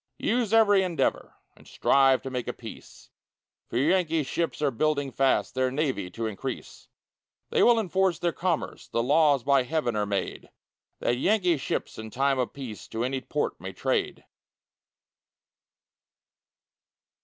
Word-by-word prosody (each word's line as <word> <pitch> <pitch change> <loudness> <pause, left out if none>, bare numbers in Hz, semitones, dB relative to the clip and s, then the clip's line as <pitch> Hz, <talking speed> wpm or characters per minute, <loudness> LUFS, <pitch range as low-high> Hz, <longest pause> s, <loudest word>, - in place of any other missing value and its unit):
Use 235 -3 0
every 210 -3 +5
endeavor, 180 -3 -1 0.2
And - - -19
strive 135 -1 +3
to 135 - -5
make 125 -2 -3
a - - -2
peace, - - -12 0.6
For - - -2
Yankee 165 +2 +2
ships 165 +5 -2
are 145 -2 +1
building 145 +2 0
fast, 135 0 +1
Their 130 0 +1
navy 130 - -2
to 115 +5 -5
increase; 110 -3 -6 0.6
They - - +2
will 240 -1 +6
enforce 190 -3 +1
their 170 +1 0
commerce, 170 -1 -2
The 115 - -1
laws 145 -1 +3
by 140 -1 +4
heaven 125 -3 -1
are 105 -1 0
made, 100 -2 -3 0.5
That 120 - +1
Yankee 180 - +2
ships 135 - -4
in 110 0 -7
time 135 +3 +1
of 125 - -1
peace 125 -7 -8
To 110 +1 -3
any 130 +1 -2
port 150 +2 -3
may - - -6
trade. - - -2
140 Hz, 145 wpm, -27 LUFS, 125-170 Hz, 0.6 s, will